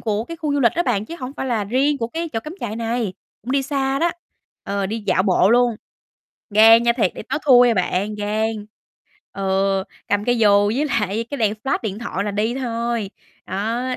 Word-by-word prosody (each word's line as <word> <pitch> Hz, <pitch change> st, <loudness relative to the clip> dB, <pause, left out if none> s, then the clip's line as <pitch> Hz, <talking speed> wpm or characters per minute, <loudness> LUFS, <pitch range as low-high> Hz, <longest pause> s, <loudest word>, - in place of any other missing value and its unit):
của 215 Hz, 0 st, -1 dB
cái 335 Hz, +6 st, -8 dB
khu 310 Hz, -3 st, -2 dB
du 285 Hz, -, +1 dB
lịch 235 Hz, -4 st, +4 dB
đó 345 Hz, -, +2 dB
bạn, 220 Hz, -, 0 dB
chứ 335 Hz, -, -7 dB
hổng 255 Hz, +1 st, -5 dB
phải -, -, -3 dB
là 225 Hz, -5 st, 0 dB
riêng 275 Hz, +7 st, +1 dB
của 230 Hz, -, -2 dB
cái 330 Hz, +5 st, -4 dB
chỗ 225 Hz, -, -2 dB
cắm 305 Hz, +8 st, -8 dB
trại 215 Hz, -, -4 dB
này. 230 Hz, -4 st, -2 dB, 0.3 s
Cũng 250 Hz, -, -4 dB
đi 275 Hz, 0 st, +2 dB
xa 270 Hz, -1 st, -1 dB
đó, 340 Hz, +3 st, +2 dB, 0.5 s
ờ, 200 Hz, -1 st, -2 dB
đi 220 Hz, +3 st, -4 dB
dạo 185 Hz, -, +3 dB
bộ 185 Hz, 0 st, +3 dB
luôn. 240 Hz, -1 st, +3 dB, 0.7 s
Gan 225 Hz, +2 st, +7 dB
nha, 235 Hz, 0 st, +3 dB
thiệt, 220 Hz, -7 st, 0 dB
đây -, -, -8 dB
tối 315 Hz, -, 0 dB
thui 245 Hz, -3 st, +7 dB
à 235 Hz, -, +2 dB
bạn, 190 Hz, +2 st, -1 dB
gan. 210 Hz, +1 st, -1 dB, 0.8 s
Ừ, 195 Hz, 0 st, 0 dB, 0.3 s
cầm 205 Hz, 0 st, 0 dB
cây 245 Hz, +1 st, +1 dB
dù 205 Hz, -2 st, +5 dB
với 285 Hz, +4 st, 0 dB
lại 215 Hz, -4 st, -1 dB
cái 285 Hz, -, -4 dB
đèn 215 Hz, -3 st, +1 dB
flash 270 Hz, -, +1 dB
điện 210 Hz, -3 st, -4 dB
thoại 200 Hz, -4 st, -3 dB
là 205 Hz, -, -2 dB
đi 215 Hz, +4 st, -1 dB
thôi. 235 Hz, -4 st, -2 dB, 0.4 s
Đó, 220 Hz, +6 st, -2 dB
230 Hz, 220 wpm, -21 LUFS, 205-250 Hz, 0.8 s, Gan